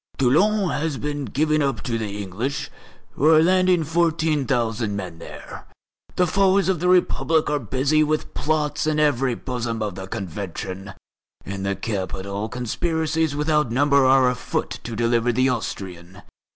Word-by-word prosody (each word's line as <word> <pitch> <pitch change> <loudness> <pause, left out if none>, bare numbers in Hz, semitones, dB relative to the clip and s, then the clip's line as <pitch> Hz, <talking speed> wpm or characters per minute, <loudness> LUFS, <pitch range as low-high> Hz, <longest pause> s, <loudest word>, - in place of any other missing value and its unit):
Toulon 185 +9 +3
has 150 -1 -2
been 145 0 -3
given 155 +6 +1
up 135 -5 -1
to 120 -4 -2
the 110 -2 -3
English, 110 +9 -4 0.4
who 150 - +1
are 160 0 +6
landing 185 -1 +3
fourteen 160 -3 +1
thousand 115 -4 0
men 90 -4 -6
there. - - -10 0.5
The 180 - +3
foes 195 +2 +3
of 185 -4 +1
the 180 - 0
Republic 165 -3 +2
are 150 - +1
busy 135 +6 +1
with 155 0 -2
plots 150 0 -1
in 155 -1 +1
the 150 -1 +4
very 130 -1 -1
bosom 120 -3 -3
of 105 -3 -3
the 95 +1 -7
Convention. 95 +1 -6 0.5
In 95 0 -5
the 100 0 -1
capital 100 +1 -4
conspiracies 160 +5 -1
without 150 -2 +1
number 140 +2 +3
are 130 0 +5
afoot 125 0 -2
to 115 - -5
deliver 120 +1 +2
the 130 +3 +2
Austrian. 95 -5 -5
135 Hz, 155 wpm, -23 LUFS, 110-155 Hz, 0.5 s, are